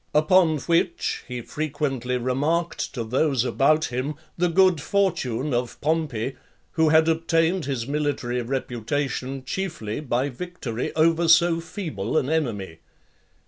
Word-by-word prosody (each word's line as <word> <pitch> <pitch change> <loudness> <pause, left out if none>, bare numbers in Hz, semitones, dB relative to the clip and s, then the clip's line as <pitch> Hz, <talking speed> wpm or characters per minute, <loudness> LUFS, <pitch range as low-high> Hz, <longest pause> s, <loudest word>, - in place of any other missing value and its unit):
Upon 160 +1 +4
which, 170 +3 0
he 125 -1 -5
frequently 135 -3 -2
remarked 145 +8 -1
to 120 - -2
those 130 +2 +1
about 155 +4 +3
him 135 +5 -2 0.2
the 175 0 +1
good 185 -2 +4
fortune 150 - 0
of 120 0 -2
Pompey, 145 -6 -1 0.3
who 160 -2 +3
had 160 +1 +5
obtained 165 +1 +1
his 130 -4 -2
military 140 -4 -1
reputation, 130 +2 -3
chiefly, 155 - -3
by 135 -1 -1
victory 130 -5 -5
over 165 +1 +3
so 165 +1 +5
feeble 160 - -3
an 135 +1 +1
enemy. 105 - -2
150 Hz, 125 wpm, -24 LUFS, 125-165 Hz, 0.3 s, had